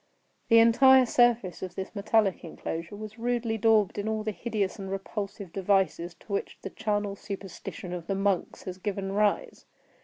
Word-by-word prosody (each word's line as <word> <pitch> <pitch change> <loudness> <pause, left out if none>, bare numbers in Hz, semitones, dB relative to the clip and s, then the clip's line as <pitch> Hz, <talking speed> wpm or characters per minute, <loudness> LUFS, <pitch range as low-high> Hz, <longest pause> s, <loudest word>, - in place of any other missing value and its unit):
The 230 - +7
entire 255 +3 +7
surface 240 -7 +2
of 185 -1 -6
this 190 - -5
metallic 205 -1 +1
enclosure 165 +2 -6
was 215 +2 -9
rudely 235 -1 0
daubed 215 -2 +3
in 205 - -3
all 220 0 -1
the 215 - -1
hideous 205 0 -2
and 195 -1 -5
repulsive 195 -1 -5
devices 190 -3 +1
to 205 - -8
which 200 - -3
the 195 - -5
charnel 205 -2 -1
superstition 195 -2 -7
of 170 -2 -6
the 195 - 0
monks 195 -2 -1
has 185 0 -7
given 195 -1 -3
rise. 205 0 0
200 Hz, 165 wpm, -28 LUFS, 190-220 Hz, -, The